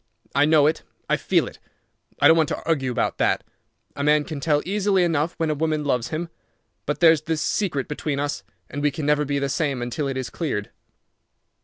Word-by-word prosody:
I 140 +2 +4
know 155 -1 +5
it. 155 - +1 0.3
I - - +3
feel - - +1
it. - - -10 0.6
I - - +6
don't 160 - +7
want 160 -3 +2
to - - -4
argue 140 -6 +1
about 120 - -1
that. - - +2 0.5
A 140 - -3
man 150 +1 +4
can 150 -1 -6
tell 150 0 +1
easily 195 0 +2
enough 165 -1 0
when 160 -1 0
a - - +2
woman 155 0 -1
loves 125 -4 0
him. 165 +4 -4 0.6
But 150 - -2
there's 160 -3 +6
this 160 0 -2
secret 160 -10 -1
between 150 -1 -3
us, 145 -7 -2 0.3
and 145 - -5
we 150 - +3
can 145 +1 -5
never 150 0 +2
be 140 0 -1
the 140 0 0
same 140 -1 -1
until 120 +4 -3
it 135 -1 -3
is 130 -3 -4
cleared." 130 -11 -3
150 Hz, 210 wpm, -23 LUFS, 140-160 Hz, 0.6 s, don't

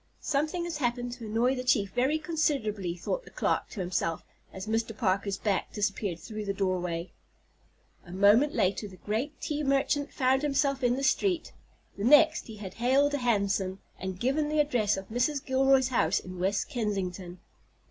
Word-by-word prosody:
"Something 310 +4 -1
has 340 -3 -3
happened 245 -2 -1
to 240 -2 -7
annoy 230 +4 +2
the 250 -1 -3
chief 210 -6 +2
very 260 +8 +1
considerably," 270 - -1
thought - - -3
the - - -13
clerk - - -1
to 205 - -5
himself 175 -2 -2 0.3
as 190 0 -7
Mr. 225 0 -2
Parker's 200 -1 0
back 200 -2 -1
disappeared 200 -3 -1
through 215 +4 -6
the 200 0 -2
doorway. 180 -3 -2 0.9
A 175 - -13
moment 205 +10 +4
later 195 +3 +1
the 190 - -12
great 225 - -3
tea 300 0 -2
merchant 280 +1 +1
found 265 0 +2
himself 275 -2 0
in 245 0 +3
the 275 - -3
street, 350 +5 +1 0.5
the - - -2
next 300 +5 +5
he 220 - -8
had 195 -3 -8
hailed 275 +4 +3
a 285 - 0
hansom, 200 -5 0 0.2
and 190 -1 -5
given 290 +6 +1
the 305 0 0
address 240 -9 +2
of 195 - -7
Mrs. 255 +5 0
Gilroy's 265 0 +3
house 195 -8 +2
in 185 -1 -9
West 195 +3 0
Kensington. 195 - -3
230 Hz, 175 wpm, -29 LUFS, 195-275 Hz, 0.9 s, next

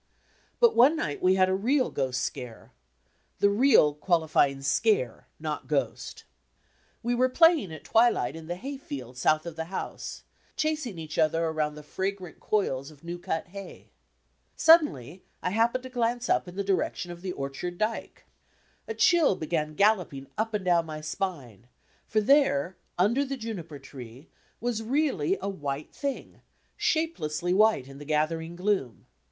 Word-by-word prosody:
But, 475 -2 +5
one 265 +7 +6
night 145 - -3
we 185 +1 +4
had 185 -1 +4
a 185 - +1
real 250 +8 +1
ghost 130 -2 -1
scare 125 -3 -6 0.7
the 200 - +3
"real" 205 - +5
qualifying 150 -4 +1
"scare," 430 - +1
not - - -4
"ghost." - - -2 0.8
We 240 +1 0
were 255 +2 +3
playing 325 - +4
at 155 - -9
twi 235 +2 +5
light 140 - -2
in 165 -1 -9
the 175 - -3
hayfield 175 - -7
south 155 +5 +2
of 170 -2 -6
the 160 - -3
house, 185 +3 -6 0.3
chasing 305 - -1
each 160 -1 -5
other 165 +1 +2
around 155 -2 -1
the 150 - -10
fragrant 190 +1 -4
coils 140 -10 -1
of 150 -1 -18
new 175 +1 -6
cut 165 0 -3
hay. 200 +1 -10 0.6
Suddenly 190 - +4 0.2
I 180 - 0
hap 225 +3 +3
pened 255 - -2
to 260 - -7
glance 245 0 -1
up - - +2
in 180 - -9
the 200 - -1
direction 190 -2 -1
of 175 0 -10
the 185 -1 -4
orchard 140 +6 -5
dyke. 215 +3 -3 0.6
A 450 - -4
chill 335 - +4
began 155 -2 -2
galloping 180 -9 +2
up 220 0 -1
and 200 -3 -3
down 170 -2 +3
my 155 -1 -6
spine, 145 - -5 0.4
for 215 - +1
there, 205 - +3 0.2
under 225 +10 +3
the 275 -1 -4
juniper 190 - -6
tree, 135 0 -12 0.3
was 235 -2 -2
really 225 - 0
a 195 - -4
"white 145 -6 -4
thing," 280 -2 -5 0.3
shape 330 -6 0
lessly 155 +4 -1
white 210 -9 +3
in 135 0 -11
the - - -8
gathering 160 +2 -1
gloom. 180 - -1
180 Hz, 165 wpm, -27 LUFS, 155-235 Hz, 0.8 s, one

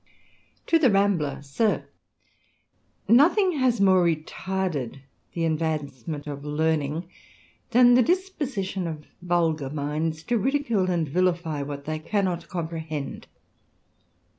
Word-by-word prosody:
TO 330 - +3
THE 275 -5 +5
RAMBLER. 195 -9 +1 1.7
lyrOTHING 330 - +4
has 250 -4 +2
more 190 -2 +5
retarded 165 -4 -2 0.3
the 165 -1 -1
advancement 155 -3 -2
of 145 -2 -5
•*• - - -15
^ - - -13
learning 155 +1 -1 0.6
than 245 0 +6
the 250 - +6
disposition 275 - -1
of 155 -2 -6 0.2
vulgar 165 -5 0
minds 155 +2 -2
to 240 +3 0
ridicule 235 -6 +1
and 170 -3 0
vilify 170 -1 0
what 140 0 -6
they 155 0 -3
cannot 180 -1 -1
comprehend. 160 -4 -5
170 Hz, 115 wpm, -25 LUFS, 155-205 Hz, 1.7 s, than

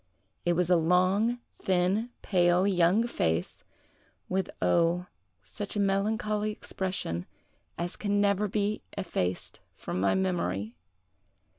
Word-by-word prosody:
It 175 - +3
was 180 +1 +1
a - - +7
long, 185 +8 +3 0.2
thin, 190 +5 +1
pale, 175 -1 +3
young 190 +3 +3
face, 80 - -1 0.6
with, 190 0 -1
oh, 175 +1 +2 0.4
such 205 0 -6
a - - 0
melancholy 210 +2 +1
expression 185 - -3 0.5
as 175 +1 -3
can 205 -1 0
never 205 0 +2
be 205 +1 -1 0.2
effaced 95 - -2 0.2
from 90 - -4
my 95 - +3
memory! 115 - -1
185 Hz, 115 wpm, -29 LUFS, 175-205 Hz, 0.6 s, a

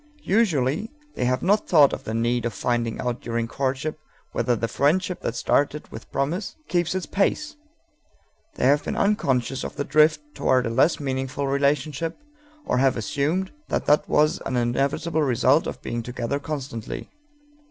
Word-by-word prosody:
Usually 190 - +1 0.2
they 125 - -1
have 130 +1 0
not 205 +4 +2
thought 150 -5 +6
of - - -5
the 110 - -3
need 120 +1 +1
of 115 -3 -2
finding 120 0 -1
out 125 -1 -2
during 115 0 -2
courtship 135 +5 -2 0.3
whether 125 - +1
the 115 +1 -1
friendship 180 +9 +1
that 115 - -3
started 145 +4 +1
with - - -10
promise 165 +9 -2
keeps 175 0 0
its 185 -3 -2
pace; 205 - 0 1.0
they - - 0
have 145 +2 +4
been - - -3
unconscious 135 - +1
of - - -6
the - - -2
drift 155 +1 +4
toward 130 -1 +2
a 115 - -1
less 135 +8 +3
meaningful 135 0 -2
relationship, 140 +3 0 0.5
or - - +1
have 135 -1 +3
assumed 150 - -1 0.2
that - - -1
that 150 - +3
was 150 +1 +3
an 130 - -1
inevitable 140 +7 0
result 135 +2 +3
of - - -6
being 120 - -3
together 125 +3 -3
constantly. 135 -7 -5
140 Hz, 165 wpm, -24 LUFS, 125-155 Hz, 1.0 s, thought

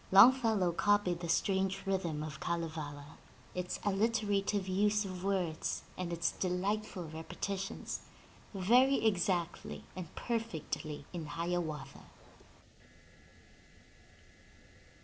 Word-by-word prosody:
Longfellow 220 -3 +7
copied 195 -1 +2
the 170 -1 -5
strange 195 +2 +1
rhythm 175 -6 -1
of 150 -3 -6
Kalevala, 155 -4 -4 0.3
its 180 0 -3
alliterative 205 -1 +1
use 205 +2 +2
of 185 -1 -6
words 185 -5 -1
and 180 -2 -3
its 170 0 +1
delightful 190 0 -1
repeti 160 +5 -4
tions, 195 - -4 0.5
very 240 +7 +4
exactly 175 -4 0
and 185 -2 -5
perfectly 160 - -3
in 165 -3 -4
Hiawatha. 160 -4 -3
185 Hz, 90 wpm, -34 LUFS, 170-205 Hz, 0.5 s, Longfellow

